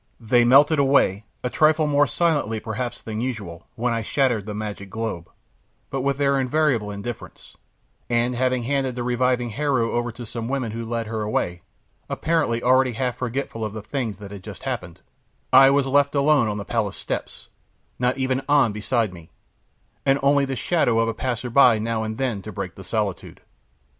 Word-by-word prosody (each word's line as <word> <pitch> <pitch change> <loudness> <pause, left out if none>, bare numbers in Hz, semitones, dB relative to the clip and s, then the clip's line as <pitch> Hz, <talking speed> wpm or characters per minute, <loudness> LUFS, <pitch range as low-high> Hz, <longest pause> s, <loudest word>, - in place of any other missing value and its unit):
They 120 +1 +3
melted 140 +5 +5
away, 135 -7 +3 0.2
a 125 - 0
trifle 155 0 +3
more 145 -1 +3
silently 145 -6 0
perhaps 115 +2 -5
than 110 0 -4
usual, 110 -10 -5
when 120 0 0
I 115 - -1
shattered 115 -3 0
the 105 - -4
magic 105 -2 -6
globe, 110 -6 -4 0.6
but 135 - -2
with 140 0 0
their 140 -1 +2
invariable 130 -5 +1
indifference, 105 +4 -8 0.5
and 120 +1 +1
having 130 0 0
handed 135 0 -1
the 125 - -3
reviving 125 -1 0
Heru 135 -3 0
over 120 0 -1
to 120 - -8
some 115 +1 -5
women 130 -4 -2
who 115 +1 -5
led 115 -1 -2
her 110 0 -4
away, 90 -4 -2 0.5
apparently 155 -8 0
already 130 0 +4
half 125 +1 -2
forgetful 125 -2 -3
of 105 -1 -3
the 110 -2 -7
things 110 -3 -3
that 100 -1 -10
had 100 -2 -9
just 105 0 -10
happened, 120 -11 -5 0.5
I 135 0 +9
was 140 0 +3
left 140 +1 +2
alone 140 -3 +4
on 105 -1 -2
the 100 - -5
palace 110 -4 -2
steps, - - -6 0.5
not 125 +1 +1
even 130 0 0
An 145 -6 +4
beside 105 0 -1
me, 85 -2 -13 0.7
and 135 0 +3
only 140 0 +4
the 135 0 -3
shadow 125 -4 +1
of 115 0 +2
a - - -1
passerby 120 0 +3
now 115 0 -1
and 110 0 -4
then 125 -7 -1
to 105 - -8
break 100 -4 -5
the 95 - -11
solitude. 100 -1 -3
120 Hz, 185 wpm, -23 LUFS, 110-135 Hz, 0.7 s, I